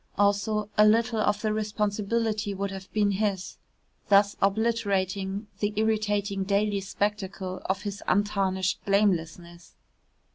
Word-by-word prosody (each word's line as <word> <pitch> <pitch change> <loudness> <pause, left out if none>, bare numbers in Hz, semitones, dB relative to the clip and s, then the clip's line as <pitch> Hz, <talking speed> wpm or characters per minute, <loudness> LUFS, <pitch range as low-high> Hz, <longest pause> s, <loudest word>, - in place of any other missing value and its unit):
Also 205 +1 +1
a - - +9
little 225 +1 +2
of 210 0 +1
the 215 -1 +1
responsibility 210 0 -1
would 200 0 -3
have 190 -1 -9
been 205 -1 +2
his 195 -2 -2 0.5
thus 200 0 +5
obliterating 200 -2 0
the 205 0 -1
irritating 210 -2 0
daily 200 +1 +1
spectacle 195 -1 -3
of 190 +1 -1
his 200 -1 -5
untarnished 190 -2 0
blamelessness. 175 -4 -1
205 Hz, 115 wpm, -27 LUFS, 195-210 Hz, 0.5 s, a